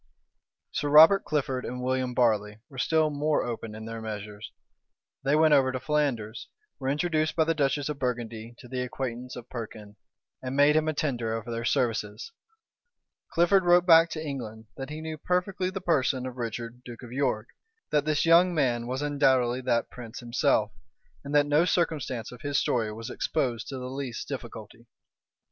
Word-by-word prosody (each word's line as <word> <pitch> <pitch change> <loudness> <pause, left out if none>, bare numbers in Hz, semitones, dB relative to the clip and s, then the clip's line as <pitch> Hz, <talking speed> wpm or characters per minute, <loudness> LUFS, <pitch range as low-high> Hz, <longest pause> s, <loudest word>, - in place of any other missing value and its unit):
Sir 145 - -2
Robert 160 +7 +8
Clifford 135 -4 -1
and 125 - -5
William 130 -1 -1
Barley 105 -3 +2
were 135 -3 -9
still 155 +3 +2
more 150 +1 +1
open 115 -2 -5
in 110 0 -8
their 115 0 -6
measures: 105 -1 -7 0.7
they 140 +2 +2
went 155 0 +5
over 135 -2 +4
to 130 - -3
Flanders, 125 -8 -1 0.3
were 135 -1 -2
introduced 155 +1 0
by 160 - +4
the 165 +1 +1
duchess 145 -2 0
of 150 -2 -4
Burgundy 120 -2 -4
to 125 - -13
the 125 +1 -3
acquaintance 125 0 -5
of 125 -1 -9
Perkin, 110 -3 -8 0.4
and 130 +1 -4
made 145 +2 +5
him 155 0 +2
a 155 - +1
tender 120 -7 -1
of 115 - -7
their 115 0 -4
services. 115 - -1 1.0
Clifford 180 +3 +4
wrote 175 0 +5
back 165 -1 +7
to 155 -1 -5
England, 115 -5 -6
that 135 +1 -6
he 155 +1 -6
knew 160 -1 -6
perfectly 180 +2 -1
the 190 +1 -5
person 140 -7 +1
of 130 -1 -6
Richard, 120 +1 -5
duke 120 0 -10
of 120 - -10
York, 125 -4 -1 0.4
that 150 -1 +3
this 155 +1 +1
young 170 +2 +5
man 120 -5 +1
was 130 +3 -3
undoubtedly 130 -4 +2
that 120 -2 0
prince 120 -1 -9
himself, 120 -3 +1 0.5
and 140 +1 -4
that 145 0 +5
no 145 +3 +3
circumstance 155 -10 -1
of 125 - -12
his 145 -1 -1
story 115 -3 0
was 115 +1 -7
exposed 125 -8 -2
to 135 - -5
the 125 - -6
least 130 -2 -5
difficulty. 115 -3 -8
130 Hz, 180 wpm, -27 LUFS, 115-150 Hz, 1.0 s, Robert